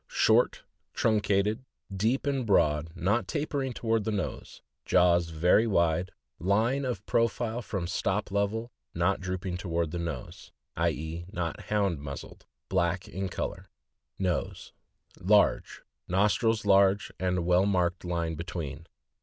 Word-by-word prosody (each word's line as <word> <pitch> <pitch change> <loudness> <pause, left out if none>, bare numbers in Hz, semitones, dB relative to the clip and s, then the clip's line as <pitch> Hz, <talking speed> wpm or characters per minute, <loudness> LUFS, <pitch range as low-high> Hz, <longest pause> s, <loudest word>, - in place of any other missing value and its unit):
— - - -50 0.2
Short, - - +3 0.3
truncated, 105 +1 +1 0.3
deep 115 +9 +1
and 140 -2 0
broad, 80 -7 +2
not 100 +7 0
tapering 145 -3 -2
toward 115 -2 0
the 110 - -1
nose; 100 -3 -5 0.2
jaws 85 -2 +3
very 90 +8 +3
wide; 85 -3 +2 0.3
line 115 +9 +1
of 115 -6 -3
profile 115 0 0
from 100 -5 -4
stop 95 +3 -1
level, 105 +4 -1 0.2
not - - +1
drooping 90 0 -3
toward 85 -3 -2
the 85 - -3
nose 80 -6 -6 0.2
(i. - - +2
e., 80 +3 -5
not 85 -5 -4
Hound 100 -7 0
muz 70 -2 -6
zled); - - -14 0.3
black 90 0 0
in 95 +1 -4
color. - - -5 0.5
Nose. 90 -3 -2 0.2
— - - -31
Large; 100 +3 +2 0.2
nostrils 105 +4 +2
large, 100 0 +4
and 90 0 0
a - - 0
well 90 +3 +3
marked 90 -3 +1
line 85 -2 -2
between. 80 -1 -6
95 Hz, 140 wpm, -28 LUFS, 85-105 Hz, 0.5 s, large